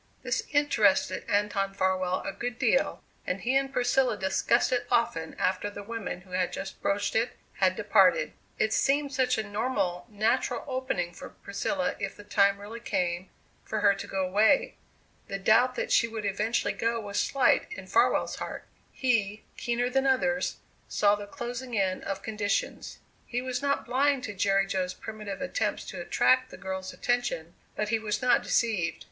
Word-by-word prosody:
This - - -1
interested 220 -11 +2
Anton 200 -1 0
Farwell 185 -1 +1
a - - -2
good 240 +5 -4
deal - - +1 0.2
and 185 - -1
he 255 +3 0
and 270 0 +2
Priscilla 250 -2 +2
discussed 190 -1 +2
it 245 -1 0
often 165 -9 0
after 185 +2 0
the 205 0 -8
woman 205 -4 -5
who 185 0 -19
had 180 0 0
just 195 0 -6
broached 200 +1 0
it 230 +2 +1 0.2
had - - +3
departed. - - +3 0.2
It 215 0 +1
seemed 280 +1 +2
such 255 -2 +2
a 220 - 0
normal, 205 -5 -1
natural 230 +3 0
opening 255 -10 -2
for - - -9
Priscilla 275 +8 -2
if 195 -2 -3
the 205 - -11
time 200 -1 +3
really 215 +3 -8
came 180 -5 -2 0.3
for 215 - -3
her 200 -1 +6
to 195 - -7
go 190 -1 -1
away. 220 - +3 0.5
The 195 - -3
doubt 225 +6 +4
that - - -3
she 230 - +4
would 220 -2 -5
eventually 210 +4 0
go 230 0 0
was 205 -2 -3
slight 275 -2 +3
in - - -7
Farwell's - - +2
heart. - - -6 0.3
He, 220 -5 0
keener 240 +1 -1
than 270 +2 +1
others, 265 0 +1 0.3
saw 205 -1 +3
the 205 0 -3
closing 240 +2 -5
in 190 -2 +1
of 195 - -4
conditions. 205 -2 -2 0.3
He 245 - -2
was 250 0 -3
not 280 0 0
blind 270 +2 +2
to 205 - -4
Jerry 195 0 +2
Jo's 185 -2 -2
primitive 215 +1 -7
attempts 275 - -1
to - - -6
attract 255 0 +3
the - - -10
girl's 190 -1 -5
attention, 240 -10 -1 0.2
but 210 0 -1
he 225 0 +2
was 210 -1 -2
not 250 - +4
deceived. 210 -8 +1
215 Hz, 175 wpm, -28 LUFS, 195-250 Hz, 0.5 s, her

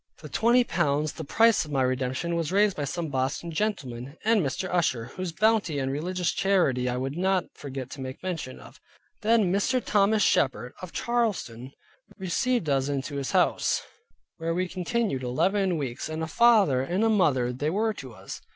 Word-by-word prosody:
The - - -8
twenty 240 +2 +4
pounds, 155 -7 0
the 160 - -7
price 225 +5 +4
of 155 - -10
my 135 -3 +1
redemption, 130 +6 -1
was 165 -1 -1
raised 200 0 +3
by 145 - -2
some 165 +3 -3
Boston 135 +5 -2
gentlemen, 140 - -3
and 225 -2 +4
Mrs. 150 +5 -2
Usher, 130 -10 +1
whose 185 -1 -4
bounty 215 -4 +2
and 135 -1 -1
religious 175 +5 -1
charity, 155 -11 +1
I 125 - -2
would 135 +2 -3
not 185 +1 +1
forget 135 -2 -7
to 135 - -7
make 130 +4 -7
mention 165 -8 -4
of. - - -15 0.4
Then 215 -4 +3
Mr. 230 +6 +2
Thomas 210 -2 +2
Shepard 125 -2 +1
of 185 -2 -7
Charlestown 185 - -2 0.4
received 205 - 0
us 135 -1 +1
into 140 +1 -3
his 135 -1 -3
house, - - +2 0.5
where 165 +1 -2
we 185 +1 0
continued 185 - -1
eleven 185 +9 +1
weeks; 135 -1 -4
and 160 +1 -3
a - - -2
father 205 - +4
and 180 +11 +1
mother 130 -10 +2
they 145 +5 -1
were 215 +5 0
to 130 - -9
us. - - -9
165 Hz, 180 wpm, -27 LUFS, 135-200 Hz, 0.5 s, twenty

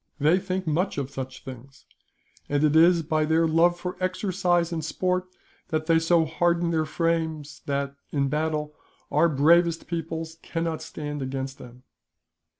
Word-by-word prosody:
They 155 +6 +4
think 185 0 -3
much 165 +4 0
of 140 -1 -3
such 130 -1 -7
things, 130 +1 -11 0.6
and 145 +1 +1
it 150 0 +3
is 170 +1 +6
by 155 0 +1
their 160 +2 +3
love 170 +2 +3
for 180 0 -5
exercise 185 -2 0
and 160 -1 -3
sport 185 +3 -1 0.4
that 155 -1 -1
they 165 0 +4
so 165 0 +3
harden 170 +2 +1
their 160 -1 +1
frames 160 -2 -2
that, 140 -1 -1 0.2
in 140 -2 +1
battle, 150 +1 -1 0.4
our 150 +4 +4
bravest 165 +3 +3
peoples 165 -1 -5
cannot 165 -1 -3
stand 145 -1 -6
against 135 0 -4
them." 125 0 -13
160 Hz, 150 wpm, -26 LUFS, 145-170 Hz, 0.6 s, is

